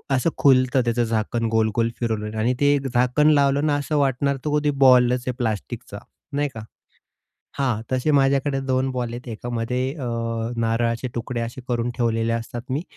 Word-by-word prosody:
असं 130 +6 +1
खुलतं, 130 -1 +4
त्याचं 120 0 +1
झाकण 115 +1 -1
गोल-गोल 110 +1 +1
फिरवल्यावर 110 -2 -2
आणि 120 +3 +2
ते 145 0 +4 0.2
झाकण 125 +5 +3
लावलं 140 0 +2
ना, 145 - +2
असं 145 +1 -2
वाटणार, 140 0 +1
तर 150 0 +1
कधी 150 0 +1
बॉलच 125 -1 +5
आहे 125 - 0
प्लास्टिकचा, 110 -5 -4 0.3
नाही 145 0 0
का? 110 - -7 1.0
हां, 120 -5 0
तसे 130 +4 +1
माझ्याकडे 135 0 +2
2 130 0 +1
बॉल 125 -2 -3
आहेत. 125 +1 -8
एकामध्ये 120 +3 -2
अ, 140 - -6 0.5
नारळाचे 115 +2 0
तुकडे 120 0 -3
असे 115 +3 -5
करून 120 0 -1
ठेवलेले 115 -1 0
असतात 115 +1 -5
मी 145 +5 -1
125 Hz, 160 wpm, -23 LUFS, 115-135 Hz, 1.0 s, बॉलच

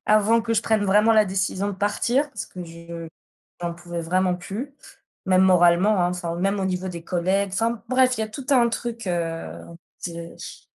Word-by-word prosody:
avant 215 +2 +4
que 230 - -1
je 215 - +3
prenne 220 -2 +1
vraiment 210 +3 +4
la 215 -1 +5
décision 190 +1 -1
de - - -2
partir 235 +8 0
parce - - -6
que 180 -1 -8
je 170 0 -9 0.5
j'en 170 -1 -3
pouvais 175 0 -6
vraiment 180 +2 +1
plus. 210 +10 -6 0.5
Même 185 0 +4
moralement, 185 +2 +5
hein. 175 - +2
Enfin, 175 -2 -3
même 195 +3 0
au - - 0
niveau 185 0 -2
des 170 -2 -7
collègues. 190 +3 0
Enfin 225 +2 -1
bref, 255 -1 +3
il - - 0
y - - +1
a - - -8
tout 255 +5 -8
un 245 -4 +5
truc, 230 -2 -4
heu, 165 - -3 0.3
c'est 170 -1 -6
ch - - -9
190 Hz, 200 wpm, -24 LUFS, 175-220 Hz, 0.5 s, la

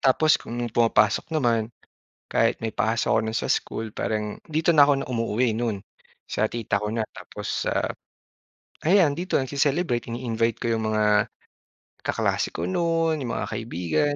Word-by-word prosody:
Tapos, 155 +4 +4
kung 120 - -7 0.2
pumapasok 110 -3 +3
naman, 115 -5 +1 0.6
kahit - - +2
may 115 - -2
pasok 115 -1 +1
ako - - +4
no'n 110 +1 -1
sa - - -3
school 110 - -1
parang 105 -1 -2
dito 160 +2 +1
na 145 - +9
ako 145 - +4
na - - -7
umuuwi 115 -1 0
no'n, 115 -4 -1 0.5
sa - - 0
tita 110 -3 -1
ko 105 - -2
na. 115 - -1 0.2
Tapos, - - -4
sa - - +1 1.1
ayan 175 -5 +5
dito 180 +1 -3
nagce-celebrate, 140 -1 +1
ini-invite 115 -1 -1
ko 115 - 0
'yong 110 -1 -1
mga 110 0 +3 1.0
kaklase - - 0
ko 80 - -3
no'n, 165 - +1
'yong 125 -4 -3
mga - - -2
kaibigan, 115 - -1
120 Hz, 155 wpm, -25 LUFS, 110-145 Hz, 1.1 s, na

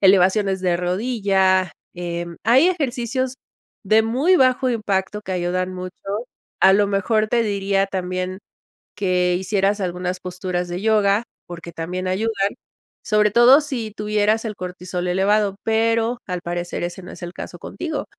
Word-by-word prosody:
elevaciones 190 0 +4
de 180 -2 +1
rodilla, 190 -1 +1 0.2
em, 170 -1 -5
hay 260 - +5
ejercicios 260 -5 -1 0.5
de 215 +2 +4
muy 270 +12 +3
bajo 255 0 +3
impacto 210 -3 -1
que 190 -2 -6
ayudan 185 +1 -1
mucho, 185 0 -6 0.7
a 190 0 +7
lo 205 +1 +4
mejor 210 +2 +1
te 235 +2 +2
diría 195 -2 0
también 185 0 -3 0.6
que 180 -2 +1
hicieras 195 +2 0
algunas 180 0 -3
posturas 180 0 -3
de 175 +2 -4
yoga, 215 0 +3 0.2
porque, 170 -1 -9
también 180 +3 -4
ayudan, 200 +1 0 0.5
sobre 210 0 +2
todo 245 +7 +7
si 245 -7 -4
tuvieras 210 +1 +1
el 220 -2 -3
cortisol 180 -1 -5
elevado, 195 +2 +2
pero, 225 +1 +1
al 180 -2 -4
parecer 175 0 -4
ese 175 +2 -5
no 180 - -10
es - - -11
el 175 - -6
caso 175 - -8
contigo. 315 - -5
195 Hz, 145 wpm, -21 LUFS, 180-220 Hz, 0.7 s, a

